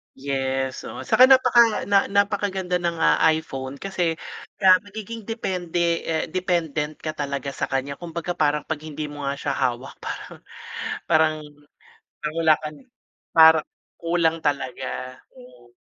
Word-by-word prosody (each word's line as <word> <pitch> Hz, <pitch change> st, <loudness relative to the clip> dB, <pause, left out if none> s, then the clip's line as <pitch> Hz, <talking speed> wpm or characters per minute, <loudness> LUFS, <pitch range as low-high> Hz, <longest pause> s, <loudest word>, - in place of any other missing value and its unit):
Yes, 135 Hz, -1 st, -2 dB
oo, -, -, -7 dB
saka 255 Hz, +1 st, +6 dB
napaka 245 Hz, -4 st, +5 dB
na 200 Hz, -1 st, +3 dB
napakaganda 200 Hz, -3 st, 0 dB
ng, 170 Hz, -1 st, -1 dB
ah, -, -, +3 dB, 0.2 s
iPhone 135 Hz, -4 st, -6 dB
kasi 175 Hz, 0 st, -2 dB, 0.4 s
kaya 185 Hz, -2 st, +6 dB
magiging 215 Hz, +2 st, -9 dB
depende, 175 Hz, -6 st, -1 dB
eh, 160 Hz, -1 st, 0 dB
dependent 165 Hz, -5 st, -1 dB
ka 155 Hz, -, -2 dB
talaga 140 Hz, -2 st, -4 dB
sa -, -, -3 dB
kanya. 135 Hz, +1 st, -3 dB
Kumbaga 170 Hz, 0 st, -5 dB
parang 150 Hz, -3 st, +1 dB
pag 160 Hz, -2 st, -4 dB
hindi 150 Hz, -1 st, -6 dB
mo 145 Hz, -1 st, -6 dB
nga 140 Hz, -, -1 dB
siya 140 Hz, 0 st, -3 dB
hawak 130 Hz, -1 st, -2 dB
parang, -, -, -7 dB, 0.7 s
parang 155 Hz, -1 st, +3 dB, 0.9 s
nawala 155 Hz, +1 st, +2 dB
ka 155 Hz, -, -4 dB
ni -, -, -18 dB, 0.5 s
parang 160 Hz, -1 st, +7 dB, 0.3 s
kulang 165 Hz, -1 st, 0 dB
talaga, 130 Hz, -2 st, -3 dB, 0.2 s
hmm. -, -, -17 dB
160 Hz, 135 wpm, -23 LUFS, 145-185 Hz, 0.9 s, parang